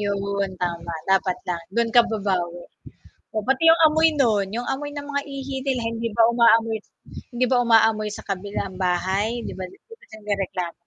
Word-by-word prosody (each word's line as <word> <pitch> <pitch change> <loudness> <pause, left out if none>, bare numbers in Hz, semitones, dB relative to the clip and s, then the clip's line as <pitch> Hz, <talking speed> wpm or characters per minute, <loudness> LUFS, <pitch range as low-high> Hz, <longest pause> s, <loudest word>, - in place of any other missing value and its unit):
'Yun, 200 -1 -2
tama, 170 -1 -3 0.2
dapat 190 -1 +2
lang, 170 -1 -2
dun 235 -1 +1
ka 240 - +8
babawi. 180 -5 -2 0.7
Oh, 215 - -1
pati 265 +4 +1
'yung 330 0 +6
amoy 315 +1 +4
nun, 210 -6 +2
'yung 240 +1 -3
amoy 290 +2 -5
ng 285 - -5
mga 285 0 0
ihi 270 0 -5
nila, 260 -2 -1
hindi 230 0 -3
ba 230 - +6
umaamoy 230 -1 +4 0.6
hindi 250 +1 +1
ba 250 -1 +4
umaamoy 225 -2 +3
sa - - -9
kabilang 195 0 -4
bahay, 190 +4 0 0.2
di - - -5
ba - - -4
di - - -17
ba 460 - -13
sila - - -20
nagrereklamo? 195 -4 -3
215 Hz, 180 wpm, -23 LUFS, 195-245 Hz, 0.7 s, ka